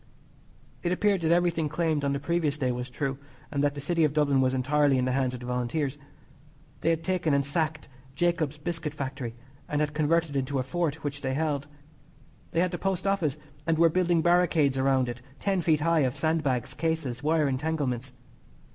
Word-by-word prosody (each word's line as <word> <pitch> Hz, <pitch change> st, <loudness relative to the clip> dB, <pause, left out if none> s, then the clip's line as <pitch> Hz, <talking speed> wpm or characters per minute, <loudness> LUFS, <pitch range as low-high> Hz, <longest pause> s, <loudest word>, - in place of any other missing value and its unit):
It 175 Hz, -, -1 dB
appeared 195 Hz, 0 st, +2 dB
that 165 Hz, 0 st, +1 dB
everything 170 Hz, -3 st, +2 dB
claimed 155 Hz, -1 st, 0 dB
on 140 Hz, -, +1 dB
the 140 Hz, -, -1 dB
previous 150 Hz, -1 st, 0 dB
day 130 Hz, -4 st, 0 dB
was 125 Hz, +1 st, -4 dB
true, 135 Hz, +1 st, -3 dB, 0.3 s
and 140 Hz, -1 st, 0 dB
that 145 Hz, 0 st, +1 dB
the -, -, -5 dB
City 165 Hz, +3 st, +1 dB
of 150 Hz, -2 st, +2 dB
Dublin 140 Hz, -3 st, +3 dB
was 130 Hz, 0 st, +2 dB
entirely 145 Hz, +1 st, +3 dB
in 125 Hz, -, +1 dB
the 130 Hz, -, 0 dB
hands 130 Hz, -1 st, 0 dB
of 125 Hz, -, -9 dB
the -, -, -7 dB
Volunteers. 130 Hz, +4 st, -2 dB, 0.8 s
They -, -, +1 dB
had 165 Hz, -1 st, +1 dB
taken 175 Hz, -5 st, +1 dB
and 140 Hz, -1 st, +1 dB
sacked 155 Hz, +1 st, -1 dB, 0.3 s
Jacob's 170 Hz, -4 st, 0 dB
Biscuit 160 Hz, -1 st, -4 dB
Factory, 130 Hz, -4 st, -4 dB, 0.3 s
and 150 Hz, -, 0 dB
had 150 Hz, 0 st, 0 dB
converted 155 Hz, 0 st, +1 dB
it -, -, +3 dB
into 135 Hz, +1 st, -2 dB
a 130 Hz, -, +1 dB
fort 160 Hz, +2 st, -2 dB
which 140 Hz, -1 st, -4 dB
they 130 Hz, -1 st, -1 dB
held. 145 Hz, -2 st, -1 dB, 0.8 s
They 165 Hz, -, +1 dB
had 180 Hz, 0 st, +1 dB
the 175 Hz, -, -4 dB
Post 190 Hz, -1 st, -1 dB
Office, 175 Hz, -8 st, +1 dB, 0.3 s
and 165 Hz, -1 st, +2 dB
were 165 Hz, +1 st, +6 dB
building 175 Hz, -1 st, +2 dB
baricades 170 Hz, -5 st, +3 dB
around 130 Hz, -1 st, +2 dB
it 120 Hz, 0 st, -5 dB, 0.2 s
ten 195 Hz, -3 st, +1 dB
feet 155 Hz, -2 st, +2 dB
high 165 Hz, +1 st, +3 dB
of 135 Hz, -1 st, +1 dB
sandbags, 145 Hz, -5 st, 0 dB
cases, 160 Hz, -7 st, -2 dB
wire 155 Hz, 0 st, +2 dB
entanglements. 135 Hz, -3 st, -1 dB
150 Hz, 200 wpm, -28 LUFS, 135-165 Hz, 0.8 s, were